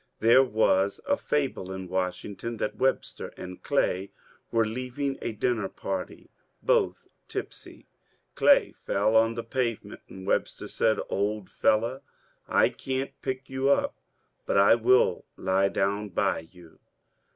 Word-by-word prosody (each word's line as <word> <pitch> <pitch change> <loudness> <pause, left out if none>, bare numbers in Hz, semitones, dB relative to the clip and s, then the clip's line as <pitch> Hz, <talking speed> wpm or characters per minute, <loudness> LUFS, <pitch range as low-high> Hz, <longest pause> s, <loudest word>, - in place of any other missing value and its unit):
There 120 +4 +6
was 105 -5 +2
a 285 - +3
fable 135 - -2
in 95 -1 -6
Washington 95 +5 -3
that 105 - -3
Webster 135 0 -1
and 90 0 -8
Clay 95 +2 0 0.4
were 115 -1 +3
leaving 130 +4 -3
a - - -2
dinner 110 -2 -1
party, 95 -1 -5 0.3
both - - +1 0.2
tipsy; - - -7 0.5
Clay - - +5
fell 105 +3 0
on 115 +1 +4
the 115 - -4
pavement, 115 -1 -3
and 95 0 -10
Webster - - -1
said: 110 -1 +1
^^ - - -4
Old 105 0 -2
fellow, 115 +5 +1 0.5
I - - +4
can't 130 0 -3
pick 130 0 -4
you 130 +1 0
up, 140 - +2 0.5
but - - +1
I 100 +2 +7
will 120 -4 +3
lie 95 +1 +2
down 100 +2 -1
by 80 -2 -1
you." 90 -3 -17
110 Hz, 140 wpm, -27 LUFS, 95-125 Hz, 0.5 s, I